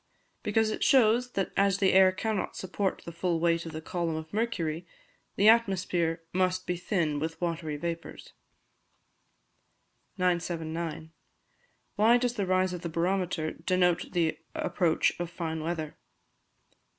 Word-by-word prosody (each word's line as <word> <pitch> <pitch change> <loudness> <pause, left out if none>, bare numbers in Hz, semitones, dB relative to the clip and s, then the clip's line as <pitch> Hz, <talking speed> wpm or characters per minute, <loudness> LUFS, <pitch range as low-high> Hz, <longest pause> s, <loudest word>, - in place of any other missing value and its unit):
_ - - -45 0.4
Because 215 +1 +1
it - - -2
shows 245 -1 +4
that 195 - -1
as 195 -1 +3
the 195 -1 +3
air 190 0 +7
cannot 215 +2 -2
support 190 +1 -2
the 170 - -6
full 170 0 -1
weight 170 0 +1
of - - -6
the 155 0 -7
column 170 -2 -2
of 160 +2 -7
mercury, 175 -7 -2 0.5
the 205 - +3
atmosphere 185 -7 +2
must 185 0 +1
be 180 - -1
thin 170 -5 -1
with 160 +2 -4
watery 165 -3 -2
vapours. 170 +2 -6 1.8
979. 170 -3 -2 0.9
_Why 230 +3 +6
does 245 -1 0
the 200 -5 -2
Rise 185 0 +2
of 175 - -5
the 170 - -4
Barometer 170 -1 -1
denote 180 +1 0
the 165 -3 +1 0.2
Approach 190 - +1
of 175 -1 -3
Fine 160 -2 -4
Weather? 160 -1 -3
175 Hz, 140 wpm, -29 LUFS, 165-195 Hz, 1.8 s, air